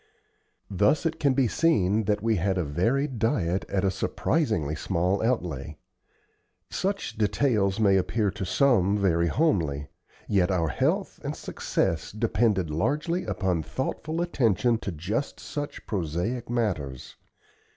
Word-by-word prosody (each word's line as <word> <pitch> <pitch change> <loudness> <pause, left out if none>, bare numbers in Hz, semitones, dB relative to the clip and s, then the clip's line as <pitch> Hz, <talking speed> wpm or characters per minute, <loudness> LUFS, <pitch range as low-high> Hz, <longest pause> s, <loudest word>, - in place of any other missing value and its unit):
Thus 105 - +2
it 160 0 -1
can 140 -3 +2
be 130 -2 +3
seen 110 - +2
that 105 +1 0
we 115 -2 +2
had 95 +2 0
a 90 - +1
varied 115 - 0
diet 95 -5 0
at 95 -1 0
a 95 - +2
surprisingly 95 - 0
small 90 +5 0
outlay. 80 - -2 0.9
Such 195 - -2
details 105 -2 +1
may 100 -3 +4
appear 100 +2 0
to 105 0 -5
some 100 -2 +3
very 85 -4 +2
homely, 80 - 0 0.4
yet 95 -3 +2
our 85 -4 +1
health - - 0
and - - -3
success 80 -1 -2
depended 105 -5 +1
largely 150 - 0
upon 90 -5 0
thoughtful 155 - -3
attention 120 - +2
to 100 - -4
just 95 - -3
such 145 -1 -6
prosaic 95 +7 -2
matters. 90 - -2
100 Hz, 130 wpm, -26 LUFS, 90-125 Hz, 0.9 s, may